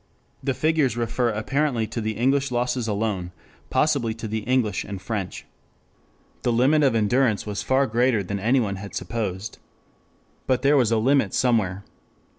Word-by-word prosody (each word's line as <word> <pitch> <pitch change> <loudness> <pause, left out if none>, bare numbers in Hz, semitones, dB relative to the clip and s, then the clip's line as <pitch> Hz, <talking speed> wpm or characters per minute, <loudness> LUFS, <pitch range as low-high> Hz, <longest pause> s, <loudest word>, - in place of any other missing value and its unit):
The 135 -1 0
figures 155 -6 +1
refer 120 +1 0
apparently 120 +2 0
to 110 +2 -5
the 110 0 -2
English 135 +3 +2
losses 125 -1 -1
alone, 100 -4 -2 0.4
possibly 135 -8 +1
to 115 0 -6
the 110 +1 -2
English 120 -1 0
and 100 -1 -6
French.] 95 -1 -5 1.0
The 120 - +1
limit 130 +6 +3
of 135 -5 +3
endurance 115 +1 +2
was 105 -2 -3
far 135 +1 +2
greater 120 -2 +1
than 100 +2 -4
anyone 110 -2 +1
had 100 +1 -8
supposed. 105 -3 -4 0.9
But 130 +1 +1
there 140 +2 +5
was 125 -5 +3
a 115 - +3
limit 130 -2 +2
somewhere. 105 -6 +1
115 Hz, 155 wpm, -24 LUFS, 105-130 Hz, 1.0 s, there